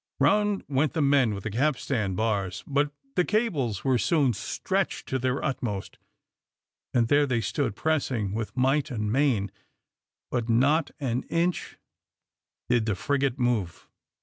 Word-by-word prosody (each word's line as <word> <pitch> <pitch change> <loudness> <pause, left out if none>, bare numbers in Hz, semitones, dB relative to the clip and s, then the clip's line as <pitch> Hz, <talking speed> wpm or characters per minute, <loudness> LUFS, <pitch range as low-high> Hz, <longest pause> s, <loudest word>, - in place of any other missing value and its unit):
Round 210 -1 +3
went 140 +1 +1
the 160 - 0
men 135 -6 +3
with 100 - -7
the 110 - -3
capstan 125 -5 0
bars, 100 -3 -1
but 145 +1 +1 0.2
the 180 - +3
cables 165 - 0
were 130 -3 +2
soon 145 -5 +2
stretched - - -2
to 130 - 0
their 130 +1 -1
utmost, 125 -8 -3 0.9
and 120 -2 +2
there 145 +3 +4
they 125 -3 +1
stood 115 +1 -1
pressing 130 -10 0
with 110 +3 -4
might 135 +3 +2
and 105 -5 -2
main, 120 -7 +1 0.8
but 120 -2 -1
not 140 +7 +3
an 125 -3 -1
inch 170 +1 -1 0.9
did 120 -2 +2
the 105 - +1
frigate 140 +5 0
move. 120 -9 -1
130 Hz, 145 wpm, -27 LUFS, 110-145 Hz, 0.9 s, there